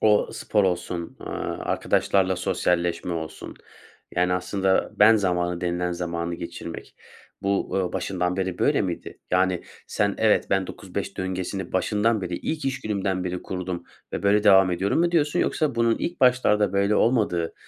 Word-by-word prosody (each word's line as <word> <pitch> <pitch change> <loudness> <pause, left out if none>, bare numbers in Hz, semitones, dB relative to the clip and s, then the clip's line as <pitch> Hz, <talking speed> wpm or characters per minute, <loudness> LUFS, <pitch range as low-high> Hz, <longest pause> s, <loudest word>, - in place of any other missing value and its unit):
o 105 -1 +4
spor 105 -2 +1
olsun, 90 -1 -2
eee, - - -10 0.4
arkadaşlarla 95 -2 +1
sosyalleşme 90 -2 0
olsun, 80 -1 -6 0.6
yani 90 +1 +2
aslında 95 +1 0
"ben 110 +2 +7
zamanı" 90 -3 0
denilen 90 0 -1
zamanı 85 0 -3
geçirmek 85 0 -8 0.5
bu, 100 0 +1
uuu, 95 -2 -1
başından 90 -1 -1
beri 95 -2 -2
böyle - - +2
miydi? - - -5
Yani 90 -1 +2 0.2
sen, 100 -1 0
"Evet, 110 -1 +3
ben 95 -1 +2
9-5 - - -6
döngesini 95 0 -4
başından 105 +3 +1
beri, 90 -1 -3
ilk 155 -2 -4
iş 135 0 -1
günümden 95 -3 -2
beri 90 0 -3
kurdum 90 -2 -4 0.3
ve - - -3
böyle 105 +1 +3
devam 95 -2 +6
ediyorum." 95 - 0
mu 170 0 +3
diyorsun? 155 +1 +2
Yoksa 150 -6 0
bunun 115 -1 +2
ilk 175 - -4
başlarda 105 -6 +3
böyle 100 +1 +2
olmadığı, 105 -9 +1
95 Hz, 155 wpm, -24 LUFS, 90-105 Hz, 0.6 s, ben